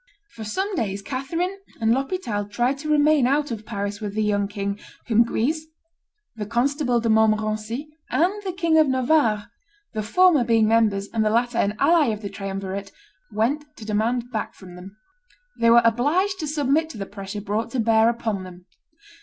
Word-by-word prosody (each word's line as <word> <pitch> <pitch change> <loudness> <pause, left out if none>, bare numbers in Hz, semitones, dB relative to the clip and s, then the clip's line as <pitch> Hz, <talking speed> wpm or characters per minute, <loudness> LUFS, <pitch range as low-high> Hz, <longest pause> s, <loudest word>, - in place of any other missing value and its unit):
For 225 - -9
some 380 - -2
days 200 - -2
Catherine 335 - -3 0.2
and 225 -1 +2
L'Hospital 265 - -2
tried 240 +6 0
to 305 +1 -5
remain 300 -3 +4
out 290 +1 +1
of 215 -2 -6
Paris 205 -1 -4
with 205 -1 -5
the 215 - +1
young 205 -1 +1
king, 200 0 -4 0.3
whom 230 -1 +4
Guise, 305 +7 -1 0.7
the 210 -2 -5
Constable 250 +2 +1
de 230 - -2
Montmorency, 220 +4 +1 0.2
and 355 +4 +2
the 385 -2 -3
King 335 -3 +2
of 310 - +5
Navarre, 255 -5 +1 0.4
the 215 - -2
former 315 - +4
being 225 -2 +3
members 215 -3 +2
and 225 -1 +1
the 215 - +2
latter 235 +1 +1
an 205 +1 +1
ally 330 0 +4
of 215 -1 -2
the 200 - -4
triumvirate, 195 0 -5 0.4
went 235 +8 0
to 220 - -9
demand 230 +3 -1
back 220 - -4
from 185 -2 -13
them. 190 +3 -12 0.6
They 230 - +4
were 235 0 +7
obliged 315 - +2
to 310 - -3
submit 300 +1 +1
to 240 - -9
the 195 - -4
pressure 195 0 -7
brought 215 +3 -2
to 260 - -1
bear 225 0 +4
upon 225 -4 -2
them. 180 -1 -11
230 Hz, 180 wpm, -23 LUFS, 210-285 Hz, 0.7 s, were